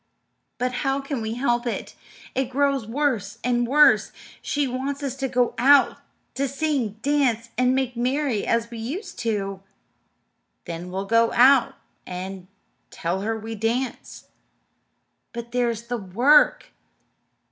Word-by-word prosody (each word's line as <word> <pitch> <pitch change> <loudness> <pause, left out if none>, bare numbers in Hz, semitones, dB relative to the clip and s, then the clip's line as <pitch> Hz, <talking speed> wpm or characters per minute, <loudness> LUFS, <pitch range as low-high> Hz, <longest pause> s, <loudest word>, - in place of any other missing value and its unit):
"But 250 +1 -1
how 270 -1 0
can 275 -3 -4
we 220 +1 -3
help 240 -1 0
it? 235 - -4 0.4
It 265 -1 -1
grows 275 -3 0
worse 235 -5 -1
and 240 -1 +1
worse. 295 +4 +5 0.3
She 290 -1 -1
wants 270 +3 -4
us 270 -2 -3
to 270 0 -1
go 245 -1 +1
out 275 +3 +5 0.4
to 275 +1 -1
sing, 275 -6 -1
dance, 260 -6 +1
and 255 +1 +2
make 260 -2 -1
merry 255 -1 0
as 230 0 0
we 230 - -7
used 285 - -6
to." 195 -4 -2 1.0
"Then 170 +1 -6
we'll 190 +2 -4
go 230 +2 +3
out 260 +1 +5 0.3
and 185 0 -6 0.4
tell 175 +3 -3
her 225 +2 -2
we 220 +1 -6
dance." 230 +4 -3 1.1
"But 235 0 -7
there's 235 -2 0
the 245 +1 -3
work." 240 +10 +3
245 Hz, 135 wpm, -24 LUFS, 225-270 Hz, 1.1 s, worse